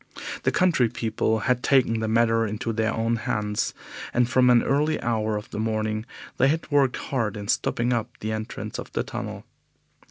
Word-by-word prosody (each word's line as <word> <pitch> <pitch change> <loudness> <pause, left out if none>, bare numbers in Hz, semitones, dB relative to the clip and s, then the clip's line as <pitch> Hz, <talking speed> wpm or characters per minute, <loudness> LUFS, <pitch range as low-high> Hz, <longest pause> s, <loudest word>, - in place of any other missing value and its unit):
The - - +1
country 165 -10 +3
people 110 -1 -1
had 125 0 +1
taken 125 -5 +3
the 110 - -1
matter 115 0 +3
into 105 +2 -3
their 110 0 +1
own 115 +1 0
hands, 105 -1 -1 0.4
and 120 0 +4
from 125 0 +4
an 120 -1 +5
early 150 +3 +1
hour 110 -2 0
of 105 - -8
the - - -4
morning 110 0 -1 0.3
they 135 - +4
had 155 +2 -1
worked 140 -3 +3
hard 115 -6 -2
in 100 0 -6
stopping 120 +3 +1
up 115 -2 -1
the 110 - -3
entrance 110 0 -5
of - - -7
the - - 0
tunnel. - - -6
115 Hz, 185 wpm, -25 LUFS, 110-125 Hz, 0.4 s, an